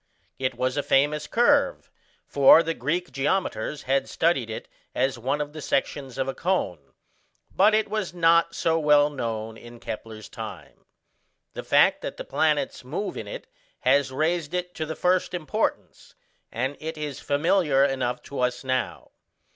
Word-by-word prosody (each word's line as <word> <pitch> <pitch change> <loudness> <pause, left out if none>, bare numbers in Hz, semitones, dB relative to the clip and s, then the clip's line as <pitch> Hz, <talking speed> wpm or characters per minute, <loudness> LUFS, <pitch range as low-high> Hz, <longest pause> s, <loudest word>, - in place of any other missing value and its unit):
It 130 -1 -1
was 130 +2 -1
a - - +2
famous 145 +2 +1
curve, 280 +4 +2 0.3
for 145 +4 +6
the 165 0 -1
Greek 165 +7 -2
geometers 145 - -1
had 135 +1 0
studied 135 -9 +1
it 110 - -6 0.3
as 130 -1 0
one 135 +5 -1
of 150 0 -4
the 155 - -7
sections 135 -1 -2
of 135 0 -1
a 135 - -2
cone, 95 - -2 0.6
but 210 +3 +5
it 220 - +1
was 215 -4 -2
not 170 -1 +3
so 165 0 +1
well 150 -1 +4
known 115 -4 -4
in 120 +1 -13
Kepler's 110 -1 -7
time. - - -9 0.7
The - - -5
fact - - +4
that - - -6
the - - -6
planets 150 -4 0
move 150 +11 -4
in - - -6
it - - -7 0.4
has 140 -1 +3
raised 160 +3 -1
it 180 0 -3
to 155 - -4
the 160 - -4
first 180 0 +1
importance, 155 -5 -3 0.4
and 130 +4 -2
it 160 0 -5
is 150 -3 -5
familiar 145 -2 +2
enough 130 -3 -2
to 140 - -7
us 125 0 0
now. 130 -1 -2
145 Hz, 165 wpm, -25 LUFS, 130-170 Hz, 0.7 s, for